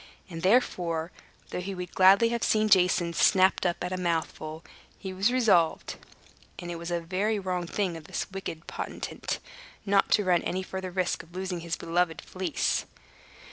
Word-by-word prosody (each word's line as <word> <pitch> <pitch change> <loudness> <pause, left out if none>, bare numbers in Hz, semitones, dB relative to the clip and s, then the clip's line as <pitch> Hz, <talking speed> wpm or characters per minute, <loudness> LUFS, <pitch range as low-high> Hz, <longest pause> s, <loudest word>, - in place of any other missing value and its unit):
And 165 -1 -6
therefore, 175 -6 +1 0.4
though - - -3
he 195 +1 -5
would 180 -1 -6
gladly 195 +5 +6
have 235 0 -2
seen 215 0 +2
Jason 180 -3 +4
snapped 185 +1 +4
up 175 - -2
at 180 +1 -3
a - - -2
mouthful, 160 -2 -2 0.3
he 190 -1 -6
was 195 +5 +2
resolved 215 -10 +2 0.6
(and 175 0 -6
it 170 - -5
was 170 +1 -6
a 175 0 0
very 195 +6 -1
wrong 180 -3 -2
thing 185 -2 -1
of 160 -2 -9
this - - -3
wicked 180 -4 -6
potentate) - - -5 0.5
not 200 -1 +3
to 210 - +4
run 180 -3 +3
any 185 +1 -2
further 190 0 -5
risk 180 0 -1
of 170 +1 -18
losing 185 -1 -3
his 170 0 -3
beloved 170 -1 0
Fleece. 185 -4 -2
180 Hz, 175 wpm, -28 LUFS, 170-195 Hz, 0.6 s, gladly